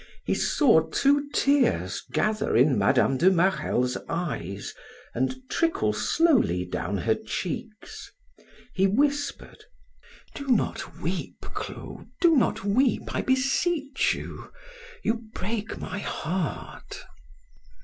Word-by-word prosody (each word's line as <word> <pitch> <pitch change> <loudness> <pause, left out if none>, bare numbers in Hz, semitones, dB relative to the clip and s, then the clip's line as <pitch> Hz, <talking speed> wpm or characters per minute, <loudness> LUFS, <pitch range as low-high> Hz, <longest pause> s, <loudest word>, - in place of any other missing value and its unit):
He - - +1
saw - - +3
two 285 +1 +2
tears 95 - +2
gather 215 - +1
in 130 +2 +5
Mme. 120 +5 +3
de 175 +7 +5
Marelle's 170 -9 +1
eyes 100 - -4 0.4
and 130 - 0
trickle 330 +5 +1
slowly 260 - +2
down 90 +2 -3
her 110 +3 +1
cheeks. 200 - -6 0.6
He 195 +1 +3
whispered: 285 +6 -1 0.7
"Do 280 - -7
not 250 - 0
weep, - - -4
Clo, - - -7
do 340 -3 +5
not 250 - +1
weep, 240 +6 +1
I - - 0
beseech 275 +2 +1
you. - - -9 0.5
You 225 +1 -1
break 215 +2 -3
my 205 - -5
heart." 180 -2 -4
205 Hz, 110 wpm, -26 LUFS, -, 0.7 s, in